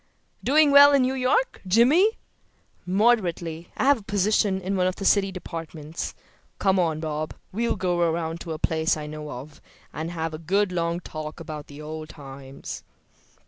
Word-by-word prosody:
"Doing 295 +2 +5
well 285 0 +9
in 275 -2 +5
New 255 +1 +1
York, 265 - +1
Jimmy?" 280 - +4 0.7
"Moderately. 180 -5 +1
I - - 0
have 280 -1 +4
a - - -15
position 205 -1 +1
in 190 +1 -2
one 185 -1 +2
of 185 - -1
the 195 - -6
city 195 -1 +4
departments. 165 -3 -6 0.4
Come 190 -1 +2
on, 160 -3 +1
Bob; 155 -1 -3 0.2
we'll 235 +4 0
go 180 -3 0
around 165 -1 0
to 165 - -5
a - - -4
place 160 0 +1
I 150 - -5
know 150 0 -7
of, 145 +3 -9 0.3
and 160 +2 -4
have 165 -2 -3
a 155 - -6
good 190 +4 +1
long 170 0 -1
talk 155 -1 -7
about 155 -3 -8
old 155 +1 -7
times." 135 -1 -9
175 Hz, 170 wpm, -25 LUFS, 155-205 Hz, 0.7 s, well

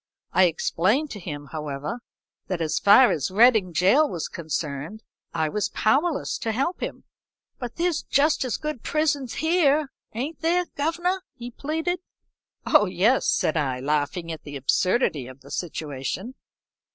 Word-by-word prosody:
I 185 +1 +6
explained 190 - +1
to 205 - -6
him, 145 -5 -7
however, 150 - -4 0.5
that 185 -3 -2
as 160 -2 0
far 215 +5 +7
as 150 - -1
Reading 215 -2 +5
gaol 200 - +4
was 170 -4 -3
concerned, 160 +4 -4 0.3
I 160 -2 0
was 205 +6 -1
powerless 285 +7 +1
to 225 - -1
help 275 +10 -1
him. - - -5 0.6
"'But 245 -2 -6
there's 340 -2 0
just 290 +1 +2
as 255 -4 -2
good 305 -6 -4
prisons 290 -5 0
here, 310 -4 +2 0.2
ain't 280 +7 -4
there, 350 +2 +2
governor?' 345 +5 0
he 245 0 -8
pleaded. 320 +7 -2 0.7
"'Oh 210 - +5
yes,' 190 +8 +2
said 155 - +1
I, 135 -5 0
laughing 150 +4 -1
at 160 - -6
the 145 -1 -9
absurdity 145 - +1
of 130 +1 -12
the 140 - -14
situation. 160 - -4
215 Hz, 150 wpm, -25 LUFS, -, 0.7 s, far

